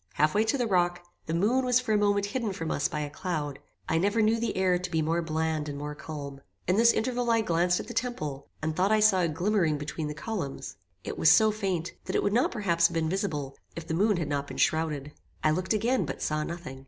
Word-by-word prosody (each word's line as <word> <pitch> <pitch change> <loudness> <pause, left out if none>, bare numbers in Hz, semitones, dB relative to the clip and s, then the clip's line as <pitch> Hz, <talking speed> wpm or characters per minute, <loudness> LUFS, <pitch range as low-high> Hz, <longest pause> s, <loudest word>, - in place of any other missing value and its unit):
Half 150 +1 +2
way 210 +2 +3
to 225 +5 +1
the 245 - 0
rock, 175 -3 +1 0.2
the 160 - -2
moon 225 +9 +2
was 250 -1 +3
for 250 -3 -1
a - - +4
moment 205 -1 +2
hidden 215 -1 -2
from 165 -4 -4
us 145 - +1
by 150 - -3
a 145 - -3
cloud. 150 -5 -3 0.3
I 160 - +1
never 205 +5 +1
knew 225 +2 +3
the 230 -3 -2
air 185 -1 +2
to 180 0 -4
be 160 - 0
more 165 +2 +1
bland 160 -1 -1
and 140 - -5
more 150 +1 -5
calm. 145 -2 -7 0.2
In 180 - +2
this 230 +2 +6
interval 245 +1 -1
I 230 -1 +4
glanced 175 -2 +1
at - - -5
the 240 - -6
temple, 155 - -3
and 155 0 -1
thought 190 +4 +2
I 215 - +4
saw 210 -3 +5
a 170 - +2
glimmering 170 -1 +1
between 150 +1 -4
the 150 - -5
columns. 165 -5 -5 0.3
It - - -5
was 160 - +6
so 220 +4 +6
faint, 190 -6 -2
that - - -3
it - - +2
would 205 - +1
not 245 +3 +3
perhaps 170 -7 +2
have 170 - -8
been 160 -1 +1
visible, 155 -8 -2 0.2
if 170 - -6
the 160 - -2
moon 205 +3 +2
had 165 -4 -2
not 140 -1 -2
been - - -8
shrowded. 150 -3 0 0.3
I 155 - +4
looked 185 +4 -1
again, 235 +4 +1
but - - -5
saw 155 0 0
nothing. 160 -6 -7
175 Hz, 250 wpm, -28 LUFS, 155-215 Hz, 0.3 s, this